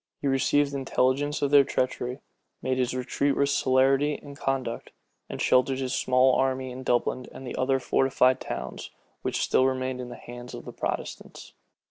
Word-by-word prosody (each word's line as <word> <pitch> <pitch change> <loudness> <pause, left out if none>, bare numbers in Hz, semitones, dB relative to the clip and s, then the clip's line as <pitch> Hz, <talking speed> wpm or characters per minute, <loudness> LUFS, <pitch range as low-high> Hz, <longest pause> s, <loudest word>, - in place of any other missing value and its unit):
He 140 - -2
received 140 +1 +2
intelligence 140 +2 0
of 140 - +1
their 145 -1 +8
treachery, 130 0 -2 0.4
made 130 0 0
his 125 0 0
retreat 135 +2 0
with 140 0 +2
celerity 135 +2 +3
and 140 0 -11
conduct, 135 -4 -3 0.4
and - - -6
sheltered 130 +1 +3
his 130 -1 -2
small 130 0 +3
army 130 0 0
in 125 +1 -7
Dublin 125 0 0
and 135 - -10
the 125 - -5
other 135 +1 +1
fortified 130 0 +2
towns, - - -6 0.3
which - - -1
still 130 - +3
remained 130 -1 -2
in 125 - -7
the 120 - -8
hands 120 +1 -9
of - - -9
the - - -8
Protestants. - - -5
130 Hz, 170 wpm, -27 LUFS, 130-135 Hz, 0.4 s, their